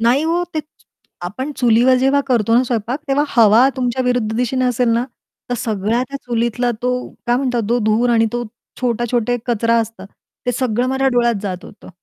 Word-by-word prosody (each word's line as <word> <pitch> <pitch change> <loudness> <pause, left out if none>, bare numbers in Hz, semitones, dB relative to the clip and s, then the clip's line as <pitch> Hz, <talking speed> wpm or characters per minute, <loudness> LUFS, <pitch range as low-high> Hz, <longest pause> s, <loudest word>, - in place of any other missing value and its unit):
नाही 245 +7 +3
ओ, 340 +2 +1
ते 310 - 0 0.6
आपण 240 +11 -4
चुलीवर 245 +1 +4
जेव्हा 270 +2 +3
करतो 230 -4 +2
ना, 245 - +5
स्वयंपाक 240 +1 -2
तेव्हा 280 +2 +2
हवा 230 +1 +5
तुमच्या 255 0 -1
विरुद्ध 245 -3 0
दिशेने 250 +1 0
असेल 250 -1 +1
ना, 230 +1 +2 0.5
तर - - +1
सगळ्या 220 +2 -1
त्या 275 - -5
चुलीतला 240 +1 0
तो 250 0 +1 0.3
काय 240 0 +3
म्हणतात 250 -3 0
तो 240 +1 +2
धूर 220 +3 +2
आणि 225 -1 +3
तो 240 0 -2 0.4
छोटा-छोटा 240 -1 0
एक 245 0 -4
कचरा 230 0 +2
असतात, 225 -4 -6 0.4
ते 245 - +1
सगळं 245 -1 0
माझ्या 265 +1 +1
डोळ्यात 240 -2 +2
जात 185 -2 -4
होतं. - - -14
240 Hz, 185 wpm, -18 LUFS, 230-255 Hz, 0.6 s, ना